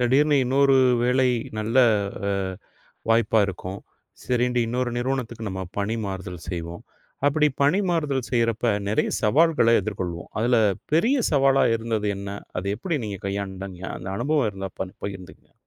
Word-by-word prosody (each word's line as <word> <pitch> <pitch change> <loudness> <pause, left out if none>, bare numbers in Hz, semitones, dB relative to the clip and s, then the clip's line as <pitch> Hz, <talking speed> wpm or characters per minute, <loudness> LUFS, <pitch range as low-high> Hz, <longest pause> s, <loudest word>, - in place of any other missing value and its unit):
திடீர்னு 140 +5 +3
இன்னொரு 135 +2 +4 0.3
வேலை 130 +1 +3 0.3
நல்ல 110 +4 0 0.5
அ - - +1 0.8
வாய்ப்பா 115 -1 +3
இருக்கும். 95 +1 -6 0.4
சரின்ட்டு 125 0 +1
இன்னொரு 125 +1 -1
நிறுவனத்துக்கு 120 -3 -3
நம்ம 95 -1 -4 0.2
பணி 100 +2 -1
மாறுதல் 95 -3 -6
செய்வோம். 85 -1 -5 0.4
அப்டிப் 150 -1 +2
பணி 150 +8 +3
மாறுதல் 145 -7 0
செய்றப்ப 115 -1 +1 0.2
நெறைய 105 - +1
சவால்கள 130 0 +4
எதிர்கொள்வோம். 90 -4 -5
அதுல 120 +2 +3 0.4
பெரிய 225 - +3 0.2
சவாலா 135 -1 +4
இருந்தது 110 -2 -2
என்ன? 100 0 -6 0.3
அத 90 - -4
எப்டி 160 - -2
நீங்கக் 100 -3 -6
கையாண்டங்க? 95 -2 -5
அந்த 90 +2 -8
அனுபவம் 140 -1 +1
இருந்தா 95 -1 -6
பன் 95 -1 -4
பகிர்ந்துக்குங்க. 95 -2 -8
115 Hz, 135 wpm, -24 LUFS, 100-135 Hz, 0.8 s, இன்னொரு